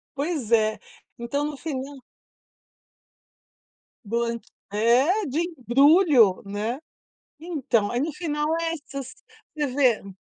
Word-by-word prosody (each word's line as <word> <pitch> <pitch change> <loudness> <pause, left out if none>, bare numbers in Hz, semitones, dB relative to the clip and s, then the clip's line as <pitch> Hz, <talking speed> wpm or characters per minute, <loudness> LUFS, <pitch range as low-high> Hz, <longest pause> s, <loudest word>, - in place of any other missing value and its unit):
Pois 285 -5 -2
é. 215 -1 +3 0.4
Então, 260 +5 -2
no 295 -2 -5
final. 280 -2 -5 2.1
Boa 235 +2 -1 0.3
é, 260 - +3
de 290 +2 -2
embrulho, 280 - +4
né. 215 +6 -3 0.6
Então, 270 -11 -1
aí 240 - -1
no 305 +4 -1
final 300 -2 -2
é 330 0 -1
essas 275 -4 -7 0.4
você 295 -2 -1
vê. 245 -8 +1
270 Hz, 105 wpm, -24 LUFS, 235-305 Hz, 2.1 s, embrulho